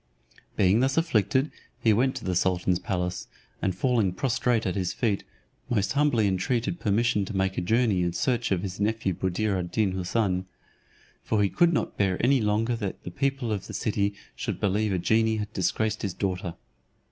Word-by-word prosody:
Being 95 Hz, +3 st, +4 dB
thus 135 Hz, +3 st, +1 dB
afflicted, 135 Hz, -, +2 dB, 0.3 s
he 115 Hz, -3 st, +4 dB
went 130 Hz, +5 st, +2 dB
to 130 Hz, -, -6 dB
the 95 Hz, -, 0 dB
sultan's 90 Hz, 0 st, +1 dB
palace, 90 Hz, -1 st, -3 dB, 0.3 s
and 95 Hz, -2 st, 0 dB
falling 110 Hz, -4 st, +1 dB
prostrate 120 Hz, +2 st, 0 dB
at 95 Hz, -, 0 dB
his 95 Hz, -3 st, -1 dB
feet, 105 Hz, -5 st, 0 dB, 0.5 s
most 105 Hz, -5 st, +1 dB
humbly 140 Hz, -6 st, +2 dB
intreated 115 Hz, -, 0 dB
permission 110 Hz, 0 st, +1 dB
to 100 Hz, 0 st, -4 dB
make 95 Hz, 0 st, 0 dB
a -, -, -1 dB
journey 110 Hz, 0 st, +2 dB
in 85 Hz, 0 st, +1 dB
search 120 Hz, -, 0 dB
of 95 Hz, -1 st, +1 dB
his 95 Hz, -1 st, -5 dB
nephew 105 Hz, -2 st, 0 dB
Buddir 95 Hz, +3 st, -1 dB
ad 90 Hz, -1 st, -4 dB
Deen 105 Hz, -4 st, +1 dB
Houssun. 95 Hz, 0 st, 0 dB, 0.8 s
For 105 Hz, -2 st, +1 dB
he 100 Hz, -, +2 dB
could 170 Hz, -, +3 dB
not 160 Hz, -, -1 dB
bear 95 Hz, -2 st, +1 dB
any 130 Hz, +1 st, +3 dB
longer 110 Hz, +3 st, +1 dB
that 100 Hz, -4 st, -5 dB
the 90 Hz, -, -6 dB
people 135 Hz, +2 st, -1 dB
of 100 Hz, -3 st, -3 dB
the -, -, -7 dB
city 100 Hz, -2 st, 0 dB, 0.2 s
should -, -, -4 dB
believe 105 Hz, +1 st, +1 dB
a 95 Hz, -, +1 dB
genie 110 Hz, +5 st, +2 dB
had 105 Hz, 0 st, -4 dB
disgraced 110 Hz, +3 st, 0 dB
his 95 Hz, -3 st, -3 dB
daughter. 90 Hz, -3 st, -2 dB
105 Hz, 185 wpm, -27 LUFS, 95-115 Hz, 0.8 s, Being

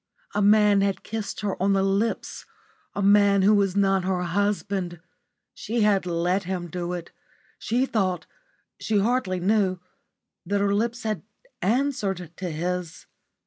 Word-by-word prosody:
A -, -, 0 dB
man 205 Hz, -1 st, +5 dB
had 195 Hz, -1 st, -1 dB
kissed 220 Hz, -1 st, -5 dB
her 200 Hz, -3 st, -3 dB
on 195 Hz, +1 st, +3 dB
the 195 Hz, 0 st, +2 dB
lips 195 Hz, +4 st, -1 dB, 0.5 s
a 200 Hz, -, -1 dB
man 200 Hz, -1 st, +5 dB
who 205 Hz, +2 st, +5 dB
was 200 Hz, -2 st, +2 dB
not 195 Hz, -2 st, +2 dB
her 185 Hz, -1 st, -1 dB
husband. 195 Hz, -1 st, -1 dB, 0.5 s
She 230 Hz, +1 st, -2 dB
had 200 Hz, -3 st, +2 dB
let 175 Hz, +3 st, 0 dB
him 180 Hz, -2 st, -4 dB
do 175 Hz, 0 st, -3 dB
it. 175 Hz, -1 st, -6 dB, 0.5 s
She 245 Hz, +4 st, 0 dB
thought 190 Hz, -8 st, -1 dB, 0.5 s
she 220 Hz, -, 0 dB
hardly 200 Hz, -3 st, +1 dB
knew 190 Hz, 0 st, +2 dB, 0.7 s
that 200 Hz, +3 st, -1 dB
her 200 Hz, 0 st, +1 dB
lips 235 Hz, +3 st, -1 dB
had 215 Hz, -6 st, -2 dB, 0.4 s
answered 200 Hz, -, 0 dB
to 185 Hz, -2 st, -4 dB
his. 175 Hz, +1 st, -4 dB
195 Hz, 145 wpm, -25 LUFS, 180-210 Hz, 0.7 s, man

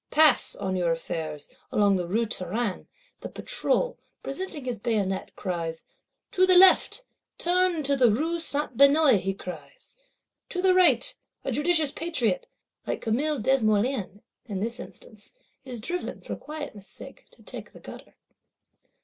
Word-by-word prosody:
Pass, 305 Hz, -4 st, +4 dB
on 190 Hz, -1 st, -3 dB
your 175 Hz, -2 st, +1 dB
affairs, 160 Hz, -2 st, -4 dB, 0.2 s
along 205 Hz, -2 st, +3 dB
the 180 Hz, -2 st, -2 dB
Rue 225 Hz, +6 st, +1 dB
Taranne, 210 Hz, 0 st, -3 dB, 0.3 s
the -, -, -7 dB
Patrol, -, -, -1 dB, 0.2 s
presenting 300 Hz, -1 st, -5 dB
his 245 Hz, -4 st, -3 dB
bayonet, 200 Hz, -4 st, -1 dB
cries, 165 Hz, -4 st, -4 dB, 0.5 s
To 370 Hz, 0 st, +3 dB
the 370 Hz, -, +6 dB
left! 380 Hz, +6 st, +6 dB, 0.3 s
Turn 360 Hz, +1 st, +2 dB
into 285 Hz, -3 st, 0 dB
the 255 Hz, -3 st, +5 dB
Rue 320 Hz, +10 st, 0 dB
Saint 295 Hz, -4 st, 0 dB
Benoit, 280 Hz, -3 st, +6 dB
he 195 Hz, +1 st, -3 dB
cries, 195 Hz, -, -10 dB, 0.5 s
To 360 Hz, -, -4 dB
the 370 Hz, 0 st, +4 dB
right! 340 Hz, -10 st, +4 dB, 0.3 s
A -, -, -1 dB
judicious 305 Hz, +2 st, +2 dB
Patriot 345 Hz, +9 st, -1 dB, 0.4 s
(like -, -, -2 dB
Camille 285 Hz, +7 st, 0 dB
Desmoulins, 215 Hz, -3 st, +1 dB, 0.3 s
in 200 Hz, -4 st, -4 dB
this 235 Hz, +4 st, -3 dB
instance) 215 Hz, -3 st, -12 dB, 0.3 s
is 250 Hz, -3 st, -7 dB
driven, 350 Hz, +11 st, -4 dB
for -, -, -5 dB
quietness's 290 Hz, -10 st, -8 dB
sake, -, -, -11 dB
to -, -, -21 dB
take -, -, -9 dB
the -, -, -14 dB
gutter. -, -, -12 dB
250 Hz, 145 wpm, -26 LUFS, 200-320 Hz, 0.5 s, the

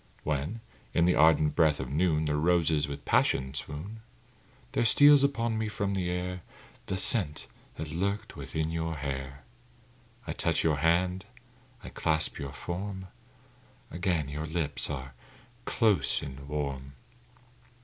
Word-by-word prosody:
When, 75 Hz, +9 st, -2 dB, 0.3 s
in 85 Hz, -, +4 dB
the 90 Hz, -, +4 dB
ardent 75 Hz, -1 st, +4 dB
breath 80 Hz, -3 st, +3 dB
of 65 Hz, -1 st, -5 dB
noon, 80 Hz, 0 st, +1 dB
The 75 Hz, -1 st, 0 dB
roses 80 Hz, -2 st, +2 dB
with 70 Hz, 0 st, -7 dB
passion 65 Hz, 0 st, +1 dB
swoon; 80 Hz, -, -5 dB, 0.7 s
There -, -, +1 dB
steals 145 Hz, +4 st, +7 dB
upon 115 Hz, -5 st, 0 dB
me 110 Hz, -, -1 dB
from 100 Hz, -1 st, -2 dB
the 90 Hz, -2 st, -1 dB
air 90 Hz, 0 st, -3 dB, 0.5 s
The 95 Hz, -, -2 dB
scent 95 Hz, -, +3 dB, 0.3 s
that 75 Hz, -1 st, -6 dB
lurked 100 Hz, +5 st, -2 dB
within 80 Hz, 0 st, -3 dB
your 80 Hz, 0 st, -2 dB
hair; 70 Hz, -1 st, -5 dB, 0.8 s
I -, -, -4 dB
touch -, -, 0 dB
your 80 Hz, -3 st, +2 dB
hand, 90 Hz, +5 st, +1 dB, 0.6 s
I -, -, -8 dB
clasp 80 Hz, -1 st, +1 dB
your 70 Hz, -1 st, -5 dB
form 95 Hz, +5 st, -6 dB, 0.8 s
Again 85 Hz, -4 st, -1 dB
your 75 Hz, +2 st, -5 dB
lips 80 Hz, -3 st, -2 dB
are 65 Hz, -2 st, -6 dB, 0.5 s
close 110 Hz, -6 st, +3 dB
and 70 Hz, -1 st, -8 dB
warm. 70 Hz, -2 st, -4 dB
80 Hz, 140 wpm, -29 LUFS, 75-95 Hz, 0.8 s, steals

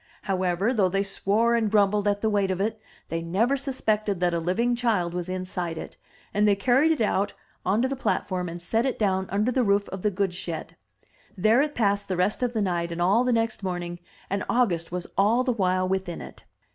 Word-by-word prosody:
However, 190 Hz, +3 st, 0 dB
though 200 Hz, -6 st, +3 dB
they 195 Hz, +2 st, +1 dB
swore 205 Hz, +4 st, +1 dB
and 230 Hz, -2 st, +2 dB
grumbled 205 Hz, 0 st, +3 dB
at 205 Hz, 0 st, +1 dB
the 220 Hz, -, +2 dB
weight 200 Hz, -2 st, +1 dB
of 185 Hz, -1 st, -1 dB
it, 215 Hz, +2 st, -1 dB, 0.3 s
they 165 Hz, 0 st, -2 dB
never 200 Hz, +11 st, +1 dB
suspected 215 Hz, -8 st, -1 dB
that 175 Hz, -1 st, +1 dB
a 170 Hz, -, +1 dB
living 225 Hz, +9 st, +1 dB
child 215 Hz, -8 st, 0 dB
was 180 Hz, 0 st, -4 dB
inside 180 Hz, -2 st, -3 dB
it, -, -, -7 dB, 0.4 s
and 210 Hz, +1 st, +3 dB
they 205 Hz, -, +4 dB
carried 260 Hz, +9 st, +3 dB
it 315 Hz, -, 0 dB
out 205 Hz, -1 st, +1 dB, 0.3 s
on 205 Hz, +6 st, +1 dB
to -, -, +3 dB
the 275 Hz, -, -2 dB
platform 185 Hz, -8 st, -1 dB
and 170 Hz, +1 st, -6 dB
set 225 Hz, +7 st, 0 dB
it 265 Hz, -1 st, -1 dB
down 190 Hz, -3 st, 0 dB
under 210 Hz, +6 st, +1 dB
the 255 Hz, -, +1 dB
roof 200 Hz, -1 st, +2 dB
of 190 Hz, -, -6 dB
the 210 Hz, -, +2 dB
goods 195 Hz, -1 st, -1 dB
shed. 170 Hz, -3 st, -6 dB, 0.6 s
There 220 Hz, +7 st, +4 dB
it 295 Hz, 0 st, -1 dB
passed 200 Hz, -3 st, +1 dB
the 185 Hz, -, -2 dB
rest 185 Hz, +6 st, +1 dB
of 245 Hz, -1 st, 0 dB
the 220 Hz, -3 st, 0 dB
night 175 Hz, -2 st, -1 dB
and 170 Hz, -, -5 dB
all 195 Hz, +7 st, +3 dB
the 250 Hz, -, +1 dB
next 230 Hz, -2 st, 0 dB
morning, 175 Hz, -2 st, -4 dB, 0.3 s
and 200 Hz, +1 st, -2 dB
August 180 Hz, -10 st, +1 dB
was 180 Hz, 0 st, -3 dB
all 225 Hz, +5 st, +4 dB
the 255 Hz, -1 st, +1 dB
while 185 Hz, -3 st, +1 dB
within 190 Hz, -2 st, -2 dB
it. -, -, -11 dB
200 Hz, 220 wpm, -26 LUFS, 180-225 Hz, 0.6 s, they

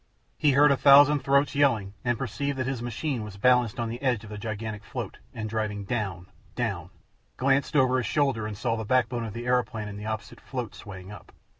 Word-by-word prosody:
He 145 Hz, -2 st, +3 dB
heard 145 Hz, +1 st, +6 dB
a 140 Hz, -, +3 dB
thousand 145 Hz, +1 st, +7 dB
throats 140 Hz, +1 st, +2 dB
yelling, 115 Hz, -9 st, +2 dB
and 120 Hz, -1 st, 0 dB
perceived 135 Hz, +3 st, -3 dB
that 130 Hz, -, -1 dB
his 130 Hz, -2 st, -3 dB
machine 120 Hz, +1 st, -3 dB
was 105 Hz, -2 st, -9 dB
balanced 125 Hz, 0 st, +3 dB
on 115 Hz, -, -1 dB
the 120 Hz, +3 st, -6 dB
edge 125 Hz, -5 st, 0 dB
of 105 Hz, -, -11 dB
the 105 Hz, -, -6 dB
gigantic 110 Hz, -1 st, -5 dB
float, -, -, -6 dB
and 110 Hz, -1 st, -5 dB
driving 105 Hz, -2 st, -2 dB
down, 95 Hz, -5 st, -3 dB, 0.3 s
down; -, -, -2 dB, 0.5 s
glanced 135 Hz, +3 st, +1 dB
over 130 Hz, -2 st, +4 dB
his 125 Hz, -, -1 dB
shoulder 135 Hz, -7 st, +1 dB
and 105 Hz, -2 st, -6 dB
saw 115 Hz, +1 st, 0 dB
the 110 Hz, -, -4 dB
backbone 120 Hz, 0 st, +1 dB
of 110 Hz, -, -6 dB
the 120 Hz, +1 st, -6 dB
aeroplane 120 Hz, -4 st, 0 dB
and 100 Hz, 0 st, -7 dB
the 105 Hz, -, -6 dB
opposite 110 Hz, 0 st, -5 dB
float 125 Hz, -5 st, -5 dB
swaying 95 Hz, -1 st, -10 dB
up. 100 Hz, -, -12 dB
120 Hz, 210 wpm, -27 LUFS, 105-135 Hz, 0.5 s, thousand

